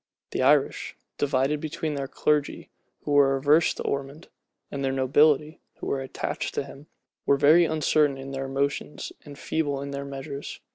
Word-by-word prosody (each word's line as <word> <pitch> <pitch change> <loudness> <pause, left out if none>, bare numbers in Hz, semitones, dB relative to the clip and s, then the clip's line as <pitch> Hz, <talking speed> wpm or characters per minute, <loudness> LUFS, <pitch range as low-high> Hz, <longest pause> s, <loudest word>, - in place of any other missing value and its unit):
The - - -1
other 140 +2 +6
Irish, - - -8 0.2
divided 140 +1 +1
between 155 0 -3
their 140 -1 -3
clergy, 150 +1 -1 0.3
who - - -4
were 140 -1 +5
averse 150 +4 +4
to - - -5
Ormond, 140 +3 -4 0.4
and 140 -1 -4
their 135 - +1
nobility, 145 +3 +3
who - - -8
were 135 - -1
attached 130 - -4
to - - 0
him, 140 +2 -13 0.4
were 140 - +4
very 155 +5 +6
uncertain 155 -2 +2
in 135 0 -8
their 135 0 -4
motions 140 +2 -2
and 145 -1 -10
feeble 145 -3 -1
in 140 0 -5
their 140 0 -4
measures. 140 +1 -7
140 Hz, 175 wpm, -26 LUFS, 135-150 Hz, 0.4 s, other